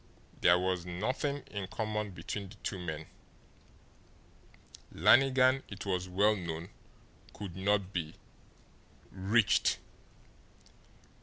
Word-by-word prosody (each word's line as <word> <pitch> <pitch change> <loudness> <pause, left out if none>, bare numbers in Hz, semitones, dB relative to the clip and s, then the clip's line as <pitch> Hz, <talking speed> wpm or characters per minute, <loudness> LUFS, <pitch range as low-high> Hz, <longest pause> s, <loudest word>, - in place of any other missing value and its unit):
There 85 0 +6
was 90 -1 0
nothing 125 - -2
in 100 -3 -4
common 105 0 -2
between 95 +2 -6
the 105 - -12
two 95 - -3
men. 80 -3 -5 1.9
Lannigan, 130 0 +5
it 100 -1 -7
was 90 -1 -1
well 100 +4 +3
known, 85 -2 -5 0.7
could 95 -5 -7
not 100 0 0
be 80 -3 -3 1.0
"reached." 100 +4 +3
95 Hz, 95 wpm, -32 LUFS, 90-110 Hz, 1.9 s, There